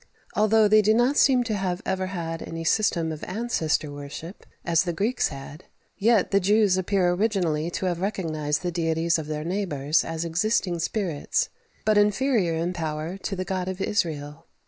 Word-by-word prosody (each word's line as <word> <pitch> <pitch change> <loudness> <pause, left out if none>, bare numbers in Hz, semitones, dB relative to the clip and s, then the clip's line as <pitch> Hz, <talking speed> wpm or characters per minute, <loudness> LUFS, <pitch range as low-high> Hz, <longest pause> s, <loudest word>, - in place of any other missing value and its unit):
Although 215 +1 +4
they 215 +1 +6
do 215 +1 +3
not 245 +5 +3
seem 260 -4 +4
to 225 -2 -2
have 185 -3 -1
ever 190 0 -1
had 165 -3 -4
any 165 0 -6
system 165 -3 +1
of 155 - -7
ancestor 180 -8 -1
worship, 145 +6 -9 0.2
as 165 -2 +3
the 175 -2 -2
Greeks 215 +8 0
had, 140 +3 -9 0.3
yet 215 -1 +2
the 200 - +4
Jews 205 0 +3
appear 185 -1 +1
originally 175 -5 0
to 180 - -3
have 175 -1 -1
recognized 155 -6 -2
the 175 - -1
deities 165 0 +1
of 155 - -6
their 150 0 -3
neighbours 160 -5 0
as 165 0 -4
existing 175 +1 0
spirits, 165 -3 -1 0.4
but 215 -1 +4
inferior 210 -4 +2
in 170 +2 -1
power 160 0 -3
to 195 0 -4
the 185 0 -3
God 185 0 -2
of 190 0 -4
Israel. 150 -8 -2
180 Hz, 175 wpm, -25 LUFS, 160-205 Hz, 0.4 s, they